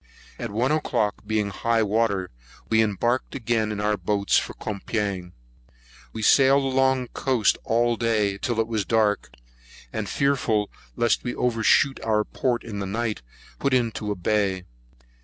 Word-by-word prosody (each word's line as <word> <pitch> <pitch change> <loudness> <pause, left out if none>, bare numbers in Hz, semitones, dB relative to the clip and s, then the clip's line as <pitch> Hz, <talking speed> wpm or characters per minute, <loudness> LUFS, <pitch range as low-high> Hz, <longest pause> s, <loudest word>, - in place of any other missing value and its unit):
At - - -4
one 120 +7 0
o'clock, 105 -9 -1
being 105 -2 0
high 115 +3 +1
water, 100 -3 0 0.4
we 110 0 +4
embarked 115 +4 0
again 115 -3 0
in 105 - -4
our 105 0 +1
boats 100 +2 0
for - - +1
Coupang. 100 -3 -3 0.8
We 110 - -6
sailed 135 +3 +5
along 130 -1 +2
the - - -9
coast 125 -6 +1
all 120 +1 +1
day 105 -4 0
till 120 -2 -1
it 115 - +2
was 110 -3 -1
dark; 105 - +1 0.6
and, - - -3
fearful 125 -7 +1 0.2
lest 120 -2 +1
we 120 - -3
should - - -10
over 120 -2 0
shoot 135 +4 +3
our 105 -1 +2
port 120 +2 -2
in 105 -3 -6
the 100 - -3
night, 110 - -2 0.4
put 140 -2 +2
into 115 -3 -1
a 105 - -1
bay. 95 0 0
110 Hz, 160 wpm, -24 LUFS, 105-120 Hz, 0.8 s, sailed